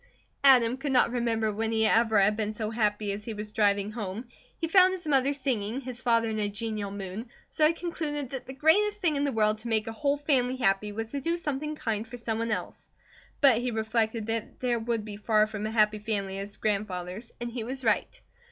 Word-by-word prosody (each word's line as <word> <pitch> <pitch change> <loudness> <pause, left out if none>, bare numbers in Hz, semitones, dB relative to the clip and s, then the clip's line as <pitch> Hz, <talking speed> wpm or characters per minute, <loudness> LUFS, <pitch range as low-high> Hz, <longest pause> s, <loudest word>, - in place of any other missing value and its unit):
Adam 250 -3 +6
could 275 +1 -3
not 250 -2 +4
remember 230 -3 0
when 220 +2 -2
he 220 0 +2
ever 220 -1 +4
had 200 +2 +4
been 215 0 -2
so 215 -1 -3
happy 210 -2 0
as 205 +1 -5
he 225 - -5
was 210 0 -6
driving 205 -1 +1
home. 215 +1 -5 0.3
He 330 - -1
found 370 +2 +6
his 360 -2 -6
mother 275 -2 +3
singing, 260 -4 -2
his 255 -1 -5
father 230 -2 +2
in 215 - -2
a 205 -1 0
genial 210 -1 -4
mood, 200 +3 -6 0.2
so 305 - +4
he 325 - +1
concluded 300 -5 -4
that 265 -2 -6
the 265 - -6
greatest 410 +9 +3
thing 335 -6 +1
in 285 0 +1
the 280 - 0
world 215 -2 +2
to 230 - -8
make 220 -2 +1
a 225 - -4
whole 285 +3 0
family 260 -4 +1
happy 210 -4 +1
was 225 +2 -5
to 280 - -3
do 335 +5 0
something 300 -2 -3
kind 225 -5 -2
for 245 - -8
someone 230 0 -2
else. 215 - -4 0.5
But 265 -6 +6
he 250 +1 -1
reflected 220 0 -1
that 225 0 -4
there 245 -2 0
would 225 -1 -2
be 210 -2 -7
far 215 0 +3
from 215 0 -4
a - - -3
happy 215 -1 +3
family 200 -3 -3
at 200 - -4
his 205 - -8
grandfather's; 200 0 -3
and 240 0 -4
he 235 -1 -4
was 260 +2 -5
right. 220 -2 +1
225 Hz, 225 wpm, -28 LUFS, 215-265 Hz, 0.5 s, Adam